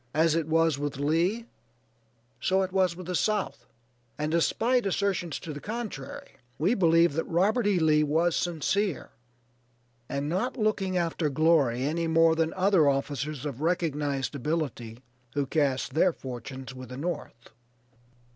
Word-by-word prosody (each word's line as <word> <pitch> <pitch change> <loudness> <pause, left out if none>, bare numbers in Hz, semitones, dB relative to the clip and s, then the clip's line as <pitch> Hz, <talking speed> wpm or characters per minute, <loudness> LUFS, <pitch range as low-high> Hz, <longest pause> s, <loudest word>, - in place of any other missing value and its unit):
As 160 0 +4
it 165 -1 0
was 160 -2 +2
with 145 -2 -3
Lee, 170 +10 +1 0.9
so 190 +8 +2
it 185 - -4
was 185 -2 +2
with 185 0 -9
the 180 - -4
South, 210 +2 -1 0.5
and 150 +1 -2
despite 230 +8 +2
assertions 190 -4 -1
to 155 - -7
the 145 - -7
contrary, 240 - -6 0.2
we 180 +9 +2
believe 165 -5 +4
that 165 - -1
Robert 205 +7 +2
E. 200 -3 +3
Lee 155 -2 +4
was 160 +3 +2
sincere, 175 0 -1 1.0
and 140 +1 -2
not 230 - -1
looking 200 -4 0
after 165 -2 0
glory 140 -5 +2
any 165 +4 -1
more 165 0 +4
than 165 0 +1
other 185 -5 +4
officers 140 +1 -2
of 140 -2 -5
recognized 150 - -1
ability, 130 -5 -3 0.3
who 145 -1 +1
cast 135 -2 0
their 170 +3 +3
fortunes 130 0 -8
with 130 -2 -10
the 125 - -7
North. 140 -6 -5
165 Hz, 145 wpm, -27 LUFS, 145-185 Hz, 1.0 s, As